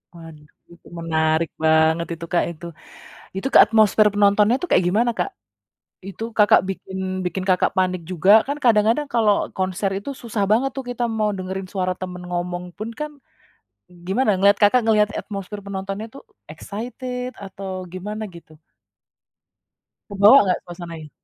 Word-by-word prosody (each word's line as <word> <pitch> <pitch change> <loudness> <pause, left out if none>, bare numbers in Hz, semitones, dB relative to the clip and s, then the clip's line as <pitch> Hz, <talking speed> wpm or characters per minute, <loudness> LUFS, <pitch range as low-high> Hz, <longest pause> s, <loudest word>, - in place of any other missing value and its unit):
Waduh, 160 -3 -13 0.2
itu 170 - -20
menarik 160 0 0
banget 160 +1 +3
itu 165 +1 -8
Kak 175 - +3
itu. 170 +1 -11 0.7
Itu 195 - -3
ke - - +9
atmosfer 215 -1 +4
penontonnya 205 +3 +4
itu 360 - -4
kayak - - +4
gimana 230 +6 +2
Kak? 180 - -1 0.8
Itu 200 +3 -7
Kakak 210 -1 +6
bikin 190 0 -6 0.3
bikin 180 +1 -3
Kakak 185 -2 +2
panik 185 -1 +1
juga 185 +3 +3 0.2
kan 285 - -1
kadang-kadang 230 +5 +3
kalau 220 -3 +4 0.2
konser 190 +1 -1
itu 205 - -8
susah 225 -3 -2
banget 245 +5 +3
tuh 270 - -4
kita 245 0 -3
mau 210 -1 +1
dengerin 190 0 -5
suara 185 -2 -1
temen 180 -1 -7
ngomong 175 0 -3
pun 215 +2 -5
kan, 300 0 -4 1.0
gimana 220 +6 0
ngeliat 200 +2 +4
Kakak 205 +5 +5
ngeliat 210 -2 +3
atmosfir 205 0 -7
penontonnya 195 +2 -5
itu 270 +5 -13 0.3
excited 250 +3 -6
atau 195 0 -8 0.2
gimana 210 +4 -6
gitu? 160 -2 -15 1.6
Kebawa 205 +7 +7
nggak 185 -2 0
suasananya? 170 -3 -9
195 Hz, 145 wpm, -21 LUFS, 180-215 Hz, 1.6 s, ke